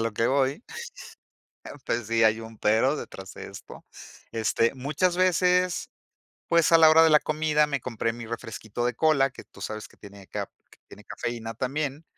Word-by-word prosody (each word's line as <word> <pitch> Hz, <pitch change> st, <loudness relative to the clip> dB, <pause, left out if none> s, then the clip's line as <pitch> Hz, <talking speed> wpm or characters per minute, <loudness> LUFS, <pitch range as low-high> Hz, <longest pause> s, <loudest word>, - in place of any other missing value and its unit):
lo 115 Hz, -1 st, -1 dB
que 115 Hz, +2 st, +1 dB
voy. 135 Hz, -, +1 dB, 1.2 s
Pues, 115 Hz, -2 st, -1 dB
sí 115 Hz, 0 st, +3 dB
hay 110 Hz, +1 st, +3 dB
un 110 Hz, -1 st, -11 dB
pero 115 Hz, +7 st, +2 dB
detrás 95 Hz, 0 st, -9 dB
de -, -, -8 dB
esto. -, -, -12 dB, 0.5 s
Este, 115 Hz, +2 st, +1 dB
muchas 150 Hz, +7 st, 0 dB
veces, 180 Hz, 0 st, +2 dB, 0.6 s
pues, 170 Hz, -1 st, +4 dB
a 165 Hz, -, +8 dB
la 160 Hz, -1 st, +8 dB
hora 160 Hz, +1 st, +7 dB
de 165 Hz, -, +6 dB
la 150 Hz, -, +7 dB
comida, 155 Hz, 0 st, +1 dB
me 140 Hz, -3 st, -2 dB
compré 115 Hz, -2 st, -2 dB
mi 120 Hz, 0 st, -8 dB
refresquito 110 Hz, 0 st, -5 dB
de 125 Hz, -, 0 dB
cola, 140 Hz, -1 st, +3 dB
que -, -, -12 dB
tú -, -, -15 dB
sabes 110 Hz, 0 st, -5 dB
que -, -, -22 dB
tiene 100 Hz, -1 st, -13 dB
caf -, -, -5 dB, 0.4 s
tiene -, -, -13 dB
cafeína 115 Hz, -1 st, -5 dB
también. 140 Hz, +5 st, -3 dB
130 Hz, 175 wpm, -26 LUFS, 115-155 Hz, 1.2 s, a